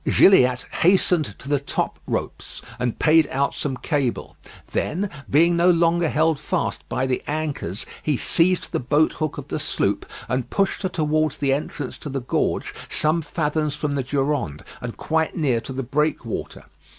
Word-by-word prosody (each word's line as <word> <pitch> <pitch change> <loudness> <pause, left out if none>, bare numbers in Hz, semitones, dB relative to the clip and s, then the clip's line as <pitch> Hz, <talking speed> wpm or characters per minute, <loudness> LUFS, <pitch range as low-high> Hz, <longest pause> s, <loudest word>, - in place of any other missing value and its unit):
Gilliatt 125 -10 +5 0.2
hastened 175 - +3
to - - -13
the 145 -1 +2
top 140 - -2
ropes - - -4 0.2
and 125 -2 -1
payed 160 -1 +5
out 140 +1 0
some 135 -3 -2
cable; 140 -6 -2 0.4
then 190 +5 -1 0.2
being 170 +4 +4
no 170 +1 +4
longer 170 -1 +3
held 160 0 +2
fast - - -2
by 130 - 0
the 130 -1 -1
anchors, 145 - -3 0.2
he 150 -4 0
seized 180 +7 +2
the - - 0
boat 150 +5 +2
hook 155 -2 -3
of - - -7
the - - -2
sloop, - - -1 0.2
and 125 -1 -1
pushed 195 -1 0
her 190 - -1
towards 155 -3 0
the 140 -2 +1
entrance 145 -1 -4
to 150 - -6
the 135 -1 -3
gorge 125 - -1 0.2
some 155 +2 +2
fathoms 150 -1 -1
from 150 -1 -2
the 140 -1 0
Durande, 135 - -1 0.2
and 125 -1 -6
quite 160 +1 0
near 130 -8 +1
to - - -8
the 135 +1 -3
breakwater. 140 -2 -2
150 Hz, 170 wpm, -23 LUFS, 135-160 Hz, 0.4 s, Gilliatt